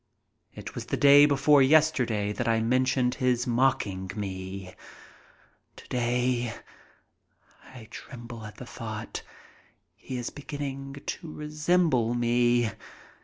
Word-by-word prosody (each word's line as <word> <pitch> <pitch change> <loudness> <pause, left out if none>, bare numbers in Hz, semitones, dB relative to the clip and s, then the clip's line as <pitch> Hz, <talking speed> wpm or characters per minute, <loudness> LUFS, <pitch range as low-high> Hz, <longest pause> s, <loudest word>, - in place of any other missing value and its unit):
It - - -8
was - - -7
the - - -1
day 145 +1 +7
before 140 0 +4
yesterday 130 -8 +3
that 120 +2 -3
I 115 -1 +3
mentioned 125 +2 +1
his 125 -2 0
mocking 115 -7 0
me. 95 -2 -6 1.0
Today—I 120 0 -5
tremble 120 -3 -9
at 105 - -12
the 125 - -9
thought—he 115 +3 -9
is 120 - -4
beginning 140 -1 -6
to 160 - -5
resemble 150 -5 +1
me! 120 -1 +2
125 Hz, 100 wpm, -27 LUFS, 115-140 Hz, 1.0 s, day